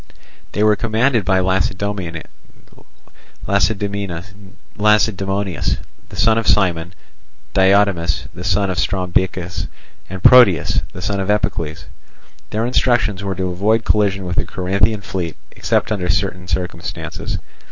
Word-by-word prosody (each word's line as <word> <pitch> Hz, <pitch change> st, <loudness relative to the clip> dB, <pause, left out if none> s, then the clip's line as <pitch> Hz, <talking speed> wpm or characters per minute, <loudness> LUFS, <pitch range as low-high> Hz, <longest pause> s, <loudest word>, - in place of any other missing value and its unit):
They 105 Hz, -, +1 dB
were 105 Hz, 0 st, +5 dB
commanded 115 Hz, +2 st, +1 dB
by 95 Hz, 0 st, +3 dB
Lacedaemonius, 95 Hz, -2 st, -1 dB, 1.2 s
the 100 Hz, +1 st, +2 dB, 2.6 s
son 110 Hz, +3 st, +3 dB
of 115 Hz, -, -4 dB
Cimon, 90 Hz, -3 st, +2 dB, 0.6 s
Diotimus, 95 Hz, -3 st, +2 dB
the 90 Hz, 0 st, -8 dB
son 95 Hz, +2 st, +1 dB
of 90 Hz, -, -2 dB
Strombichus, 90 Hz, -4 st, -1 dB, 0.4 s
and 95 Hz, -1 st, -7 dB
Proteas, 95 Hz, -, +6 dB
the 90 Hz, -, -8 dB
son 100 Hz, +1 st, -1 dB
of 95 Hz, +1 st, -2 dB
Epicles. 85 Hz, -7 st, -1 dB, 0.6 s
Their 110 Hz, +2 st, -1 dB
instructions 120 Hz, -5 st, +1 dB
were 95 Hz, -1 st, -2 dB
to 95 Hz, 0 st, -2 dB
avoid 110 Hz, +5 st, +1 dB
collision 100 Hz, -3 st, +1 dB
with 90 Hz, -1 st, -4 dB
the -, -, +2 dB
Corinthian 100 Hz, +3 st, 0 dB
fleet 90 Hz, -4 st, -4 dB, 0.2 s
except -, -, -1 dB
under 90 Hz, -4 st, -1 dB
certain 90 Hz, 0 st, -1 dB
circumstances. 85 Hz, 0 st, -4 dB
95 Hz, 115 wpm, -19 LUFS, 90-105 Hz, 2.6 s, Proteas